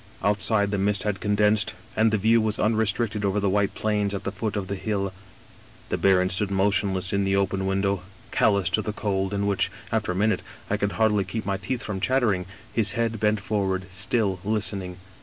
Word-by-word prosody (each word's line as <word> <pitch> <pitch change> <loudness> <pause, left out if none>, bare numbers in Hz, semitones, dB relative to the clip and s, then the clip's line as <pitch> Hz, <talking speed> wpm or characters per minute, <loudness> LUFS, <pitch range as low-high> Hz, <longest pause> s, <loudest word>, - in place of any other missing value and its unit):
Outside 100 0 +2
the 100 - 0
mist 100 0 +1
had 105 -2 -1
condensed, 105 +1 +2 0.2
and 110 0 +4
the 110 - +2
view 110 +3 +4
was^ 110 -1 0
unrestricted 110 0 +1
over 100 +1 +1
the 100 -1 +1
white 100 0 +1
plains 105 -2 0
at 100 - -5
the - - -2
foot 110 -2 -3
of 100 -2 -2
the 100 - -3
hill. 100 -1 -2 0.4
" - - -24
The - - 0
baron 95 -1 +3
stood 95 +2 +1
motionless 95 -1 +1
in 100 0 +2
the 95 0 +1
open 95 0 0
window, 95 0 0 0.3
cal 105 - +3
lous 100 -3 +1
to 110 - +2
the 105 - -4
cold 95 -2 -1
in 100 0 -1
which, 95 -1 +1 0.2
after 110 -4 0
a - - -3
minute, 105 +3 +1 0.3
I 100 - +2
could 100 -1 -1
hardly 105 -3 +2
keep 105 +3 -5
my 100 -1 -1
teeth 130 +3 -3
from 100 -3 -4
chattering, 105 -8 +1 0.3
his 105 -4 +2
head 115 -1 -1
bent 105 -1 +1
forward, 95 -3 -1
still 100 0 0
listening. 100 -4 -2
100 Hz, 210 wpm, -25 LUFS, 95-110 Hz, 0.4 s, and